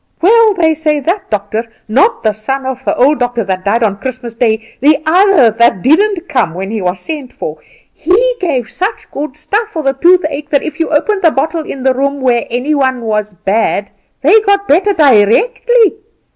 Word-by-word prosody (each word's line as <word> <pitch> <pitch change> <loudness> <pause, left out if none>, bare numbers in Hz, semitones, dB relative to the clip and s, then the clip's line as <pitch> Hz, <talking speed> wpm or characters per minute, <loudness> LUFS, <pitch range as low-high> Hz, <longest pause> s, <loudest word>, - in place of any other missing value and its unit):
"Well, 435 +3 +4
they 325 -3 +2
say 305 -1 -1
that 350 +8 -3
doctor 210 +1 -2 0.2
not 275 - +1
the 215 -2 +1
son 265 +6 -4
of 265 0 -5
the - - -1
old 285 +4 +3
doctor 245 -2 -1
that 190 -1 -3
died 220 +4 +1
on 200 -2 -1
Christmas 255 -1 -6
day, 225 -1 -2
the 290 +3 +4
other 345 - +4
that 225 -4 +1
didn't 365 +5 +2
come 240 - -1
when 190 +2 -5
he 220 -2 -3
was 180 0 -2
sent 285 - -6
for 155 0 -7 0.3
he 445 +10 +1
gave 270 - -2
such 390 +5 -4
good 290 -1 -6
stuff 420 +8 -2
for 325 -7 -5
the 270 -1 +1
toothache 305 -1 +1
that 285 -2 +1
if 315 - -6
you 325 - -1
opened 385 +7 0
the 330 - +5
bottle 315 +3 -2
in 275 -4 -7
the 265 0 +3
room 280 +2 -2
where 245 -3 0
any 250 +6 -1
one 260 -3 0
was 210 -2 -2
bad 205 0 0 0.3
they 400 +10 +5
got 400 -1 0
better 375 +7 +3
directly. 420 - +3
275 Hz, 195 wpm, -13 LUFS, 230-350 Hz, 0.3 s, the